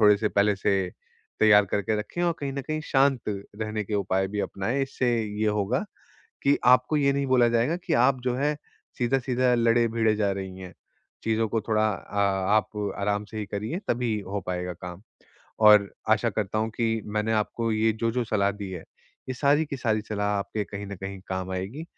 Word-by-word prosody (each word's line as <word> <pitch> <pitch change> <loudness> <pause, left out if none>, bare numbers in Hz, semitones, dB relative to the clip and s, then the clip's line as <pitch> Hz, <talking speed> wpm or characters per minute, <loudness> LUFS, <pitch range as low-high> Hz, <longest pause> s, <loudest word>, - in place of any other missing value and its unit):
थोड़े 105 -1 +7
से 105 +1 0
पहले 100 0 +2
से 95 -1 0 0.5
तैयार 105 -1 +7
करके 100 +3 -1
रखें 115 +11 -4
और 175 -1 +2
कहीं 140 -1 -3
न 140 0 -4
कहीं 155 +2 -3
शांत 135 -2 +3
रहने 105 +1 -4
के 105 - -4
उपाय 95 -1 +1
भी 105 +1 -3
अपनाएँ। 115 +8 -1
इससे 135 -2 -1 0.3
ये - - +2
होगा 105 - 0 0.6
कि 140 +1 +4
आपको 125 +4 +5
ये 140 -1 +3
नहीं 140 0 0
बोला 125 -2 +4
जाएगा 120 +7 +1
कि 180 - -3
आप 130 +2 +3
जो 125 -1 0
है 145 +3 0 0.4
सीधा-सीधा, 125 0 +1
लड़े-भीड़े 115 -1 +2
जा 105 -2 +1
रही 95 -1 -6
हैं। 95 -1 -9 0.5
चीज़ों 110 0 +1
को 110 0 0
थोड़ा 110 -1 +2
अ, 100 +1 -5 0.4
आप 105 -1 -1
आराम 105 +1 0
से 110 +1 -9
ही 105 - -3
करिए 105 - -4
तभी 115 -3 0
हो 100 +1 -3
पाएगा 90 0 -3
काम। 90 +1 -9 0.6
और 105 -2 +7 0.2
आशा - - +3
करता 105 0 -2
हूँ 110 +1 0
कि 115 -1 0
मैंने 105 +1 -1
आपको 110 +1 0
ये 110 +1 +2
जो-जो 115 +1 0
सलाह 100 -2 +1
दी 100 -1 -7
है, 90 -3 -7 0.4
ये 130 - -2
सारी 145 +4 +3
की 140 - -5
सारी 110 -4 0
सलाह 105 -1 -1
आपके 105 +1 -3
कहीं 100 0 -7
न 100 - -7
कहीं 95 +1 -7
काम 95 0 -3
आएगी 100 - -4
110 Hz, 195 wpm, -26 LUFS, 100-125 Hz, 0.6 s, थोड़े